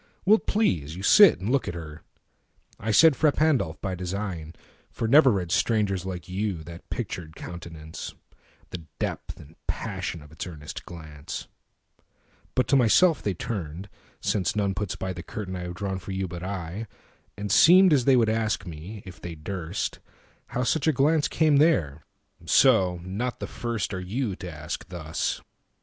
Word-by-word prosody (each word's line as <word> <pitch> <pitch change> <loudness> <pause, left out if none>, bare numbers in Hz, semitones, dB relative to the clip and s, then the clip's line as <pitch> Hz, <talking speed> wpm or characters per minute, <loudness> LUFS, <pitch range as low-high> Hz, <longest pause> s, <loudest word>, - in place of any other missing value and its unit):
Will't 215 +3 +4
please 85 - +1
you 95 - -7
sit 205 - +7
and 100 +6 -2
look 140 -1 +1
at 85 - -3
her? 75 -2 -8 0.8
I 110 - -4
said"Frà 150 +5 +6
Pandolf" 135 - +1
by 95 - -2
design, 90 -3 -4 0.3
for 115 - -3
never 140 +3 +7
readStrangers 100 0 +1
like 90 -3 -5
you 95 -3 -2
that 85 +1 -11
pictured 85 -8 -5
countenance, 80 -2 -8 0.6
The 90 - -5 0.2
depth - - -4
and 75 +3 -14
passion 80 - -4
of 75 - -16
its 80 +3 -6
earnest 75 -3 -8
glance, 75 -4 -8 1.1
But 130 - +2
to 140 - +5
myself 145 +7 +5
they 100 -3 -1
turned 90 -1 -5 0.3
(since 95 -1 0
none 100 -2 +1
puts 95 0 -3
byThe 95 -2 -5
curtain 100 -5 -5
I - - -4
have 90 0 -6
drawn 95 +1 -3
for 95 +1 -7
you, 95 0 -2
but 85 0 -7
I)And 100 +2 -7
seemed 185 - +7
as 130 -5 +3
they 135 - +6
would 115 -3 +4
ask 110 0 0
me, 90 +5 -8
if 90 -2 -11
they 85 -1 -6
durst, 85 +3 -4 0.5
How 125 - -2
such 160 +4 +1
a - - +6
glance 150 +3 +3
came 155 -3 +3
there; 85 - +3 0.5
so, 90 -2 +4
not 105 +7 -3
the - - -3
firstAre 105 -5 -3
you 115 +6 -2
to 90 - -8
turn - - -5
and 75 -2 -9
ask 85 +3 -5
thus. 80 -3 -3
95 Hz, 165 wpm, -26 LUFS, 85-120 Hz, 1.1 s, sit